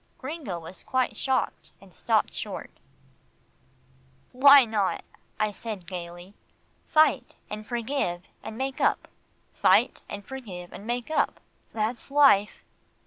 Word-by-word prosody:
Gringo 265 - -5
was 170 +2 -10
quite 260 -1 0
shocked, 265 -1 -2
and - - -18
stopped - - +1
short. - - -5 1.6
"Why 275 +1 +8
not," 210 -4 -1 0.4
I 215 0 +1
said 205 -2 -7
gaily. 175 +1 -8 0.5
"Fight, 310 0 +3 0.2
and 215 0 -5
forgive, 235 -7 -2 0.2
and 220 - -8
make 265 +1 -3
up - - +2 0.5
fight, - - +3
and 205 -1 -7
forgive, 195 -10 -8
and 205 - -9
make 245 +4 -3
up. - - +1 0.3
That's 225 +3 -3
life." 275 -8 +4
225 Hz, 120 wpm, -27 LUFS, 190-265 Hz, 1.6 s, Why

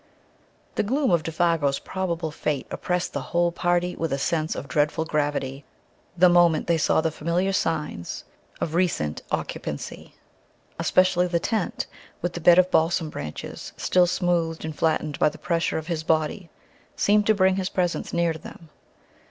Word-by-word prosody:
The - - +1
gloom 265 +3 +1
of 170 -2 +3
Défago's 160 -3 +1
probable 170 -4 -3
fate 150 -2 -2
oppressed 180 0 -2
the - - -2
whole 175 0 +1
party 175 +1 0
with 165 -1 -2
a 135 - +1
sense 155 +3 -1
of - - -6
dreadful 150 +3 +1
gravity 145 -3 -1 0.5
the 180 +1 +7
moment 175 -3 +4
they 170 -1 +2
saw 155 - +3
the 160 0 0
familiar 170 +5 0
signs 150 - -2 0.4
of 160 - -2
recent 165 - 0
occupancy. - - -5 0.6
Especially 180 -1 +3
the 170 -1 0
tent, 215 +2 -1 0.3
with 175 -1 -2
the 175 - -5
bed 175 +1 +7
of 185 0 +4
balsam 160 -1 +2
branches 75 - -7
still 180 -1 +3
smoothed 175 -3 0
and 160 -1 -5
flattened 155 -2 0
by - - +4
the 155 - -12
pressure 165 +2 -1
of 160 - -4
his 165 -2 -2
body, 160 +3 0 0.5
seemed 210 0 +3
to 215 - +5
bring 190 -1 +3
his 190 -1 -1
presence 175 -2 -1
near 170 -1 +1
to 160 - -9
them. 160 +1 -12
170 Hz, 165 wpm, -25 LUFS, 155-180 Hz, 0.6 s, the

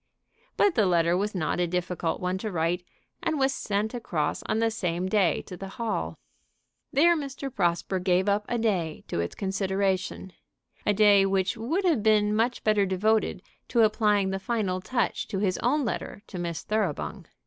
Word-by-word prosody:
But 405 - +4
the 215 -8 +3
letter 170 -1 +3
was 205 +2 -1
not 175 -1 -1
a 175 - +2
difficult 180 -1 -2
one 180 +1 -2
to 215 +1 -4
write, 175 +1 0 0.4
and 315 - 0
was 270 0 +2
sent 215 -3 -2
across 160 -11 -2
on 220 - 0
the 225 0 +2
same 180 -4 -2
day 190 -5 +2
to 180 - -9
the 195 +2 -7
Hall. 85 - -2 0.7
There 340 +5 +5
Mr. 275 -3 -5
Prosper 175 +2 0
gave 180 +1 +2
up 205 +1 +2
a 240 - 0
day 185 -9 -1
to - - -2
its 85 - -3
consideration, 190 -1 -1 0.5
a 210 - +4
day 205 -1 +6
which 190 +2 +1
would 315 - -1
have 320 -11 +3
been 210 -1 +3
much 235 +3 0
better 210 -2 +3
devoted 215 +4 +1 0.2
to 235 -2 +3
applying 210 -3 +2
the 195 - -2
final 195 -4 -1
touch 245 +4 -1
to 200 - -3
his 190 -2 0
own 275 +4 +1
letter 210 -2 -4
to 185 - -7
Miss 170 -2 -3
Thoroughbung. 215 0 -2
200 Hz, 180 wpm, -27 LUFS, 180-225 Hz, 0.7 s, day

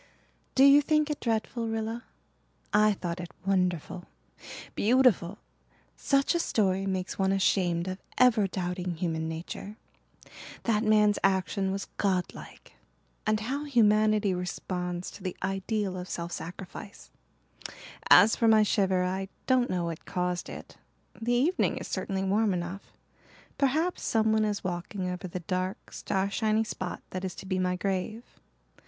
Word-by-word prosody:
"Do 265 - +6
you 280 +1 +8
think 305 0 +1
it 295 - -3
dreadful, 230 0 -1
Rilla? 225 +1 -3 0.7
I 210 0 +5
thought 175 -2 -4
it 175 -1 -6 0.2
wonderful 180 -2 -1 0.7
beautiful. 220 -5 +3 0.6
Such 275 +2 +2
a 340 - +1
story 195 - +1
makes 185 0 -3
one 190 0 +2
ashamed 180 -3 +1
of 185 +1 -4 0.2
ever 235 -5 +5
doubting 180 -1 -3
human 160 -2 -2
nature. 170 +5 -6 0.9
That 220 -2 +1
man's 210 -1 +4
action 190 0 +1
was 195 +1 -3
godlike. 185 -3 -3 0.5
And 215 0 +2
how 275 +6 -3
humanity 215 -5 +3
responds 180 0 -4
to 200 - -12
the 185 -1 -4
ideal 195 +1 -1
of 180 0 -6
self 170 0 -4
sacrifice. 180 +4 -8 1.0
As 220 - +8
for 230 - +2
my 220 -1 +6
shiver, 190 -3 +2
I 190 +1 -2 0.2
don't 255 -2 +3
know 180 -2 -1
what 165 -1 -5
caused 180 -2 -2
it. - - -10 0.4
The 240 +2 +1
evening 310 +10 +2
is - - -6
certainly 195 -1 -2
warm 200 +1 +2
enough. 175 +3 -6 0.7
Perhaps 310 +6 +1
someone 220 -1 +2
is 210 -1 -2
walking 185 +1 -3
over 180 +1 -4
the 180 +1 -5
dark, 185 +2 -3
starshiny 215 +3 0
spot 185 -4 -5
that 185 0 -4
is 185 -2 -4
to - - -9
be 185 -1 -1
my 180 0 +1
grave. 195 +4 -2
195 Hz, 140 wpm, -28 LUFS, 180-220 Hz, 1.0 s, you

